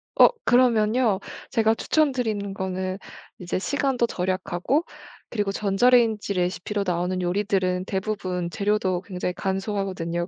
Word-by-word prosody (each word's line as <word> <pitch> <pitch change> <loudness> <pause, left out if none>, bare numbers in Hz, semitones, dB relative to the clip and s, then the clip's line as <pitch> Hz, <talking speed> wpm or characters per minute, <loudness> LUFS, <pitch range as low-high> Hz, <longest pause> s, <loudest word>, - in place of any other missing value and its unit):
어 - - +9 0.2
그러면요. 235 -3 +3 0.3
제가 225 -3 +3
추천드리는 225 -8 0
거는 190 0 -3 0.4
이제 180 -1 -3
시간도 270 +3 0
절약하고 185 - -1 0.5
그리고 205 -3 -1
전자레인지 215 +1 +3
레시피로 185 +3 -1
나오는 180 +1 -1
요리들은 185 0 0
대부분 190 -3 -3
재료도 195 -1 0
굉장히 180 -2 -4
간소하거든요. 190 -3 -2
195 Hz, 335 characters per minute, -24 LUFS, 185-220 Hz, 0.5 s, 어